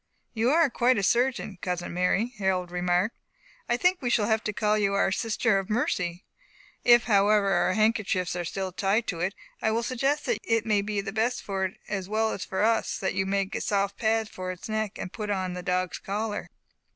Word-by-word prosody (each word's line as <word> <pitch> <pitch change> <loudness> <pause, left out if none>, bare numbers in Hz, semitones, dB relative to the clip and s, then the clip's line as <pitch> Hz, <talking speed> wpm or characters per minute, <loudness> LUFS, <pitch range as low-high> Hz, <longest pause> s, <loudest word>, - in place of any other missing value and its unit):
"You 230 +1 +1
are 325 +2 +5
quite 245 +1 +3
a 200 - 0
surgeon, 235 -3 +1
cousin 180 -1 -3
Mary," 195 +7 +1
Harold 185 -2 0
remarked. 180 +4 +1 0.5
"I 240 - +2
think 360 +6 +2
we 245 - -1
shall 220 -3 +2
have 220 0 +1
to 210 - 0
call 210 +1 +1
you 200 -2 +1
our 200 - +2
'Sister 220 0 +1
of 195 - -6
Mercy.' 180 -6 -1 0.6
If, 240 -1 +6
however, 205 -1 +3
our 185 0 +2
handkerchiefs 210 -4 +1
are 175 - -2
still 190 +2 -3
tied 200 +5 +1
to 170 - -3
it, 185 +4 -1 0.3
I - - +2
will 225 +2 0
suggest 270 +5 0
that 480 - 0
it 225 -1 +1
may 210 -2 +2
be 205 0 -2
best 220 +5 -1
for 195 -1 -1
it, 185 - -5
as 195 -2 -4
well 220 +1 +1
as 185 - -4
for 190 +2 -2
us, 225 +1 +1
that 190 - -2
you 190 - 0
make 195 +1 -1
a - - -2
soft 200 -1 0
pad 220 -1 +1
for 185 -2 -6
its 180 - -8
neck, 215 -1 -2
and 180 - -6
put 210 -2 -5
on 185 -3 -1
the 180 - -5
dog's 180 -1 -1
collar." 210 +1 -3
205 Hz, 210 wpm, -27 LUFS, 190-225 Hz, 0.6 s, If